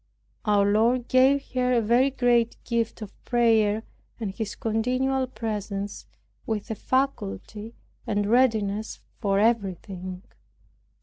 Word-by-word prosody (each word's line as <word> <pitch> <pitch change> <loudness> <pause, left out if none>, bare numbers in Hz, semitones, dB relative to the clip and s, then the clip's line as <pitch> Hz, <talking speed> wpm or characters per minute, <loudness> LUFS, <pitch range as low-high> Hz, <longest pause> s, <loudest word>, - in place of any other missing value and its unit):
Our 205 -2 +3
Lord 230 +4 +2
gave 265 +2 +3
her 250 0 +1
a 240 - +4
very 240 +5 +4
great 240 -3 +2
gift 230 -2 -2
of 205 - -13
prayer 225 -3 +2 0.4
and 215 -4 -3
His 215 0 -4
continual 255 +4 0
presence, 210 -4 -5 0.4
with 220 -1 -3
a - - -2
faculty 220 - -2 0.3
and 205 -1 0
readiness 220 -3 +1 0.2
for 200 -3 +1
everything. 190 -4 -1
225 Hz, 115 wpm, -26 LUFS, 205-245 Hz, 0.4 s, a